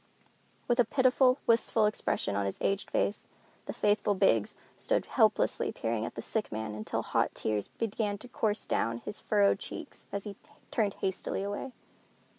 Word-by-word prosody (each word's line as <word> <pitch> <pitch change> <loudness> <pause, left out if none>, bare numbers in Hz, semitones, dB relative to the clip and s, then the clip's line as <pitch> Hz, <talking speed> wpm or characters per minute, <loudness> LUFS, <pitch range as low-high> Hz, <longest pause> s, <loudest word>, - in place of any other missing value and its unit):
With 240 0 +1
a - - +8
pitiful, 255 +2 +3
wistful 225 -1 +4
expression 210 - 0
on 100 -1 0
his 95 - -4
aged 195 0 -1
face, 205 - -1 0.4
the - - -2
faithful 205 0 +1
Biggs 115 - +2 0.2
stood - - 0
helplessly - - +2
peering 115 -1 -2
at - - -9
the - - -5
sick 220 -2 -1
man 110 0 -4
until 105 0 -3
hot - - 0
tears 105 -2 -1
began 210 -2 -2
to 250 - -11
course 220 -3 0
down 115 0 0
his 210 - -5
furrowed 200 -2 +3
cheeks, - - -8
and 200 -1 -3
he 205 -1 -7 0.4
turned 210 -4 0
hastily 190 0 -2
away. 205 +6 -4
205 Hz, 165 wpm, -30 LUFS, -, 0.4 s, a